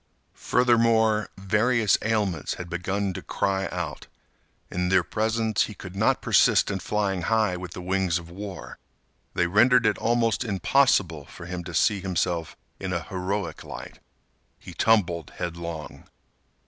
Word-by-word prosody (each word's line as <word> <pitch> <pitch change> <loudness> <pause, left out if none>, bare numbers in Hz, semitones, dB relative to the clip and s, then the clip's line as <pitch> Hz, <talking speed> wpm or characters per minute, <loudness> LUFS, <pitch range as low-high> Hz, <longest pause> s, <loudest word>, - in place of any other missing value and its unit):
Furthermore, 115 -3 +2
various 105 +3 +2
ailments 105 - -1
had 90 -1 -8
begun 95 +2 -2
to - - -6
cry 95 -1 -1
out. - - -5 0.6
In 90 0 -1
their 95 -1 +4
presence 110 +3 0
he 105 - -9
could 95 -1 -10
not 105 +3 +1
persist - - +4
in 95 - -2
flying 95 0 -1
high 110 0 +1
with 90 -1 -7
the 90 - -7
wings 95 -2 +1
of 85 -1 -8
war; 95 +2 -8 0.6
they 90 - +2
rendered 120 +7 +4
it 110 - +2
almost 115 -1 +1
impossible 95 - +2
for 85 - -11
him 90 0 -5
to 85 -2 -6
see 100 +4 +3
himself 90 -3 -2 0.2
in 95 -1 -4
a 85 -2 -2
heroic 95 -2 -3
light. - - -9 0.6
He - - -11
tumbled 85 -8 +1
headlong. 85 -2 -6
95 Hz, 145 wpm, -25 LUFS, 90-110 Hz, 0.6 s, their